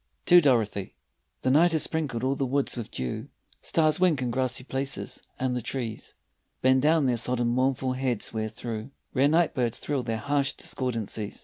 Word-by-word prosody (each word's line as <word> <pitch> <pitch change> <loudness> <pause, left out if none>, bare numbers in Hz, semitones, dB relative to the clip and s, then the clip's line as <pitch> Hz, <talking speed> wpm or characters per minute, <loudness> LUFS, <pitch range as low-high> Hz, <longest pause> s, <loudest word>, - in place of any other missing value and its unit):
TO 175 0 +8
DOROTHY 110 - +1 0.5
THE 130 - +3
night 165 +5 +5
has 160 - +2
sprinkled 145 -7 -2
all 130 +1 +2
the 140 - -2
woods 140 +2 0
with 120 -3 -5
dew, 65 -1 -4 0.3
Stars 155 -1 +2
wink 175 -6 +3
in 125 -2 -1
grassy 130 0 0
places, 135 +1 -3 0.2
and 130 -1 -1
the 125 - -1
trees 115 -2 -5 0.5
Bend 130 0 +5
down 155 0 +4
their 125 -2 +2
sodden 120 0 0
mournful 130 +1 +1
heads 125 -4 -2
where 110 -1 -2
through 110 +1 -6 0.2
Rare 135 +2 +4
night 165 +2 +3
birds 120 -2 -1
thrill 145 -3 -2
their 115 -2 -2
harsh 140 +3 0
discordancies. 115 -4 -3
130 Hz, 180 wpm, -27 LUFS, 120-140 Hz, 0.5 s, TO